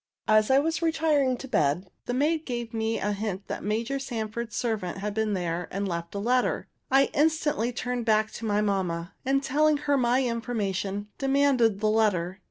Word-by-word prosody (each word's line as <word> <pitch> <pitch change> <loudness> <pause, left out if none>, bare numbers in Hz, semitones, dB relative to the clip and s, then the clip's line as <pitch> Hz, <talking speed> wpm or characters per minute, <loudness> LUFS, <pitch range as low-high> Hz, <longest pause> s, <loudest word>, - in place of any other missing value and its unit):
As 215 0 +4
I 265 - +5
was 320 +4 +1
retiring 310 -5 +2
to 270 - -8
bed, 175 - 0 0.2
the 245 - -1
maid 310 +4 +1
gave 240 -2 -4
me 225 0 -1
a 205 - -1
hint 205 -1 -3
that - - -5
Major 225 +6 -1
Sanford's 235 -3 -4
servant 215 -7 -2
had 205 +1 -3
been 215 -1 0
here 175 -1 -2
and 200 +1 -2
left 170 0 -4
a - - -1
letter. 245 +5 +1 0.2
I 270 +1 +5
turned 295 - +2
instantly 250 -6 -1
back 215 -1 +2
to 230 - -7
my 210 -1 +1
mamma, 185 -4 -1
and, 275 +1 +2
telling 300 +3 +3
her 285 -1 +1
my 250 +1 +2
information, 205 -4 -2
demanded 270 -6 +3
the 215 - +3
letter. 190 -4 +1
225 Hz, 180 wpm, -27 LUFS, 205-270 Hz, 0.2 s, I